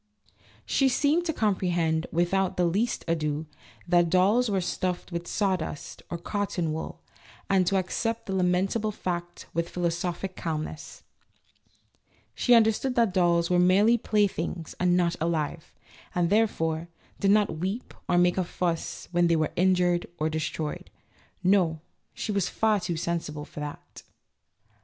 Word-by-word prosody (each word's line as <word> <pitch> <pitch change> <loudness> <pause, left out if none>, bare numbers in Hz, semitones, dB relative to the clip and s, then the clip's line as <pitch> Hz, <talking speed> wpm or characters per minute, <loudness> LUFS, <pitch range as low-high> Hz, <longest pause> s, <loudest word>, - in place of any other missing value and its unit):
She 270 -1 +3
seemed 295 +7 +2
to 325 - +1
comprehend, 175 - 0
without 180 +3 +1
the 180 - +3
least 205 +8 0
ado, 155 -2 -1 0.4
that 175 -1 +4
dolls 200 +7 +3
were 195 -2 +1
stuffed 180 0 -2
with 170 0 -4
sawdust, 185 -7 -2
or 170 - -3
cotton 175 -3 -2
wool, 160 - -6 0.5
and 190 -2 +3
to 195 - +3
accept 225 +5 -2
the 195 - -4
lamentable 190 +4 +1
fact 175 -3 -5
with 170 0 -1
philosophic 175 +2 -2
calmness; 155 -1 -5 1.3
she 245 - +4
understood 230 +3 +3
that 230 -6 +3
dolls 170 -2 +2
were 175 - +4
merely 195 +6 +5
playthings 195 -7 -1
and 180 0 +3
not 170 -1 +2
alive, 160 -1 -2 0.4
and, 175 0 +1
therefore, 165 -7 +1 0.3
did 195 - +2
not 205 -6 +3
weep 195 +8 -3 0.2
or 175 - +3
make 175 +1 +3
a - - +2
fuss 170 -1 -3
when 175 -1 +3
they 170 - +3
were 155 -1 0
injured 180 -1 +2
or 155 +1 0
destroyed. 155 -1 -3 0.5
No, 180 -4 +3 0.4
she - - -3
was 200 -3 0
far 215 -2 +2
too 175 -3 -3
sensible 160 -3 -3
for - - -10
that. 150 0 -8
180 Hz, 145 wpm, -27 LUFS, 170-200 Hz, 1.3 s, merely